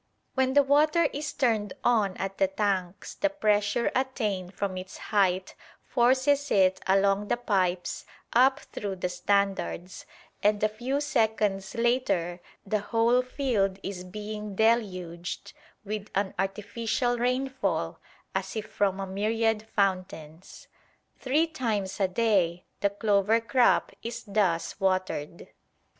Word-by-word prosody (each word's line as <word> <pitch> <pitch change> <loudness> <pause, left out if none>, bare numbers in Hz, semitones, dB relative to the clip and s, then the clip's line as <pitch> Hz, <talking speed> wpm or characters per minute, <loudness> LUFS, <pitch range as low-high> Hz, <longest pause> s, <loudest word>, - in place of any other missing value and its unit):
When 265 0 +1
the 285 - +7
water 300 +4 +4
is 295 +1 -3
turned 220 -6 0
on 210 -6 +2
at 195 0 -4
the 290 - +4
tanks 200 -9 -2
the 300 - 0
pressure 215 -4 +1
attained 210 -8 -1
from 200 -2 -2
its 185 +1 -7
height 190 -3 +1 0.3
forces 265 +4 +2
it 190 -1 +3
along 195 +1 +3
the - - +1
pipes 185 -6 -1 0.3
up 260 +3 +4
through 200 -2 -5
the 180 -1 -2
standards, 190 0 -1 0.3
and 210 0 +2
a - - +6
few 250 +6 -2
seconds 220 -7 0
later 205 -8 +1 0.3
the 210 +1 0
whole 230 +4 +2
field 245 -7 0
is 190 -2 -5
being 210 +2 -6
deluged 185 -6 0 0.3
with 210 0 -4
an 195 0 0
artificial 230 +5 -1
rainfall 245 -10 -1 0.3
as 190 +1 -3
if 215 -1 -3
from 195 -2 0
a 195 - -2
myriad 220 +3 0
fountains. 185 -4 -2 0.5
Three 285 +5 +2
times 215 - -2
a 195 - +3
day 185 -4 +1
the 200 - +2
clover 205 +1 +2
crop 235 +2 +3
is 235 0 -5
thus 195 -5 0
watered. 185 -5 -1
205 Hz, 125 wpm, -27 LUFS, 190-240 Hz, 0.5 s, the